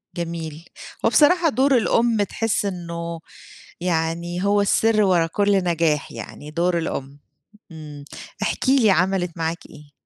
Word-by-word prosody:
جميل، 165 -2 -5 0.4
هو - - +5
بصراحة 335 +2 +4
دور 265 +1 +3
الأم 230 -2 +2
تحس 215 +1 -1
إنّه 170 -3 -5 0.6
يعني 170 +1 -2
هو 205 +1 +3
السر 215 +2 +3
ورا 180 -4 +3
كل 200 +2 +1
نجاح 165 -4 0
يعني 150 - -9
دور 170 +2 0
الأم، 140 -3 -5 0.5
امم 150 -3 -10 0.4
احكِ - - -1
لي 260 -5 +5
عملت 185 0 +1
معاك 165 +1 -2
إيه؟ 145 -1 -15
175 Hz, 130 wpm, -22 LUFS, 165-205 Hz, 0.6 s, هو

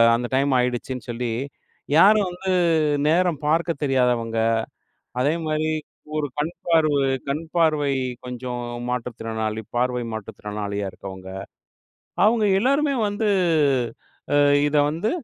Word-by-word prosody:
அந்த 120 +1 -2
டைம்" 140 0 +2
ஆகிடுச்சுன்னு 125 +1 -2
சொல்லி 120 0 -2 0.7
யாரும் 205 +3 +6
வந்து 180 +2 -5 0.6
நேரம் 165 -1 +2
பார்க்கத் 165 0 +1
தெரியாதவங்க, 125 -4 +1 0.8
அதே 145 +4 +2
மாதிரி 155 0 0 0.5
ஒரு 150 -1 0
கண்பார்வு 155 -1 +1 0.3
கண்பார்வை 155 -1 +1 0.3
கொஞ்சம் 125 0 -5 0.3
மாற்றுத்திறனாளி, 115 -3 -3
பார்வை 125 0 0
மாற்றுத்திறனாளியா 105 -1 -5
இருக்கவங்க, 95 -1 -9 1.0
அவங்க 220 0 +3
எல்லாருமே 280 +4 +2
வந்து 205 +2 -1 1.4
இத 145 - -2
வந்து 165 +8 -1
140 Hz, 95 wpm, -23 LUFS, 120-165 Hz, 1.4 s, யாரும்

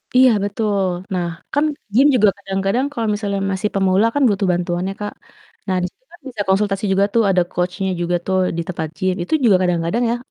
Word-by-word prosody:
Iya, 255 0 +7
betul 205 -1 0 0.3
nah 180 -2 -1 0.3
kan 290 +2 +2 0.3
gym 270 +6 +6
juga 210 -4 +5
kadang-kadang 195 +5 -1
kalo 235 -5 -3
misalnya 205 -1 -2
masih 195 +2 -1
pemula 195 +1 +3
kan 285 - +2
butuh 200 -1 0
bantuan 175 0 -1
ya - - -4
Kak. 205 0 -4 0.5
Nah 190 - 0
di - - 0
situ - - -46
kan 345 - -16
bisa 230 -5 -5
konsultasi 195 +1 +1
juga 195 +1 +3
tuh 230 - +4
ada 185 -2 +3
coach-nya 180 +2 -2
juga 175 +1 0
tuh 190 0 0 0.2
di - - 0
tempat 165 -3 -3
gym, 185 -1 0
itu 175 - -5
juga 215 -5 +5
kadang-kadang 180 +6 0
ya, - - +1
195 Hz, 205 wpm, -19 LUFS, 185-215 Hz, 0.5 s, Iya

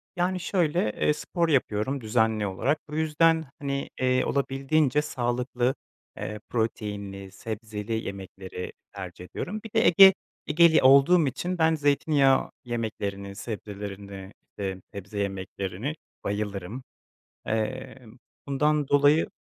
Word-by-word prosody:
Yani 180 +1 0
şöyle: 170 - +1
Eee, 150 - +2
spor 170 +2 -1
yapıyorum 130 -1 +1
düzenli 110 -1 +1
olarak 135 +11 0
bu 150 - -6
yüzden 160 +1 +3
hani, 140 -1 -3
eee, 130 0 +2
olabildiğince 140 +1 +1
sağlıklı, 125 -1 -1 0.4
eee, 105 0 -5
proteinli, 100 -4 -3
sebzeli 110 +1 -5
yemekleri 95 -3 -6 0.2
tercih 90 -2 -8
ediyorum. 205 - -5
Bir 225 - -10
de - - +3
Ege 190 +2 +9 0.3
Ege'li 160 +1 +5
olduğum 140 +5 +6
için 180 +7 -3
ben 160 -1 +3
zeytinyağı 145 -2 +3
yemeklerini 100 -4 -4
sebzelerini, 100 -2 -7 0.3
eee, 95 -2 -3
sebze 100 +1 -6
yemeklerini 95 - -3 0.3
bayılırım. 100 +3 -3 0.6
Eee, 130 +5 -2 0.5
bundan 150 +1 +1
dolayı 145 +2 +4
125 Hz, 110 wpm, -27 LUFS, 100-150 Hz, 0.6 s, Ege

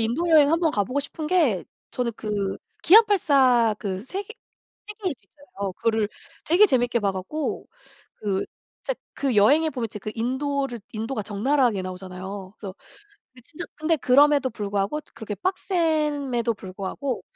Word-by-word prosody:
인도 245 +10 0
여행 300 -3 +6
한번 330 -1 +2
가 205 -6 0
보고 260 +6 -1
싶은 300 +2 -5
게 300 - +2 0.3
저는 240 -2 -1
그 205 -3 -2 0.3
기안84 285 - +5
그 190 -4 -3
세계 395 - -6 0.5
태계일주 405 - -5
있잖아요. 200 -7 -7
그거를 220 +2 0 0.4
되게 365 +6 +6
재밌게 245 - +1
봐 200 -1 +1
갖고 190 +12 -4 0.5
그 195 -2 -1 0.4
진짜 - - -2 0.2
그 275 -3 -1
여행에 295 +10 +5
보면 240 -4 -3
진짜 210 -1 -9
그 215 - -4
인도를 265 +1 -2
인도가 225 +1 -3
적나라하게 225 0 +1
나오잖아요. 185 +1 -7
그래서 195 -3 -7 0.7
진짜 340 +4 -7
근데 315 +2 +1
그럼에도 280 0 +4
불구하고 205 +5 -2
그렇게 220 -2 -5
빡셈에도 300 - 0
불구하고 195 +8 -5
250 Hz, 320 characters per minute, -24 LUFS, 205-305 Hz, 0.7 s, 여행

